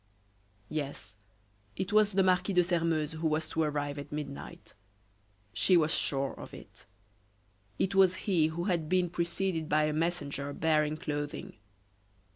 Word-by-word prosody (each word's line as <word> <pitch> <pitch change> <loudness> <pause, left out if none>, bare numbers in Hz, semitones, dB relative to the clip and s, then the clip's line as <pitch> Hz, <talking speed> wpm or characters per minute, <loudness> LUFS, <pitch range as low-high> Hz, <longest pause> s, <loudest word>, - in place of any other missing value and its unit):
Yes, 140 -8 -5 0.6
it 185 - -3
was 210 -1 +4
the 195 0 +4
Marquis 185 +1 +2
de 180 -1 +5
Sairmeuse 165 -3 0
who 160 0 -2
was 155 +1 0
to 160 - -1
arrive 145 -1 -1
at 145 0 -8
midnight. 140 -7 -7 0.8
She 185 +8 +4
was 160 -1 +2
sure 135 -1 0
of - - -10
it. - - -14 0.9
It 190 - 0
was 190 -1 +5
he 175 -6 +3
who 165 +2 -3
had 170 -5 -1
been 180 -2 +2
preceded 170 -1 -1
by 155 +1 +3
a 150 0 +1
messenger 145 -3 -2
bearing 155 -1 +1
clothing. 145 -1 -4
160 Hz, 145 wpm, -30 LUFS, 150-180 Hz, 0.9 s, de